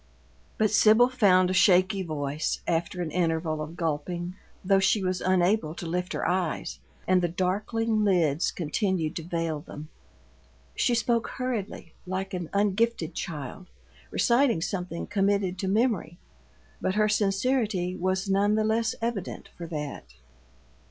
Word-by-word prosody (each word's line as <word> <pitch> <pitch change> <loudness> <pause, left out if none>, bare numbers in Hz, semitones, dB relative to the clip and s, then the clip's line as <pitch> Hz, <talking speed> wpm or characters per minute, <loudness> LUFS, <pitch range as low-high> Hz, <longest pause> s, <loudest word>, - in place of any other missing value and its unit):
But 215 -1 +2
Sibyl 220 +3 +6
found 185 -7 +4
a - - 0
shaky 185 +1 +4
voice, 150 -3 -2
after 170 +2 -1
an 160 - -5
interval 160 -2 0
of 155 +2 -6
gulping, 170 +2 -2 0.3
though 195 0 +4
she 195 +1 +2
was 185 0 -1
unable 185 -2 +2
to 175 - -7
lift 180 +2 -2
her - - -1
eyes, 180 -2 -1 0.3
and 185 -1 +4
the 175 - +1
darkling 210 +5 0
lids 170 -6 +2
continued 175 -1 -1
to 165 - -5
veil 165 -2 -2
them. 150 +1 -10 0.9
She 240 - +2
spoke 230 0 +1
hurriedly, 220 -9 -4
like 190 +1 -3
an 175 -3 -4
ungifted 205 -2 +1
child 155 +2 -6 0.4
reciting 240 -5 +3
something 180 -1 -3
committed 195 -2 0
to 190 - -2
memory, 200 -5 0 0.6
but 190 - 0
her 215 0 +3
sincerity 205 -2 0
was 185 +2 -1
none 200 +2 +2
the 215 - +2
less 220 +1 +1
evident 230 -6 -4
for 170 - -7
that. 150 - -6
185 Hz, 140 wpm, -27 LUFS, 170-210 Hz, 0.9 s, Sibyl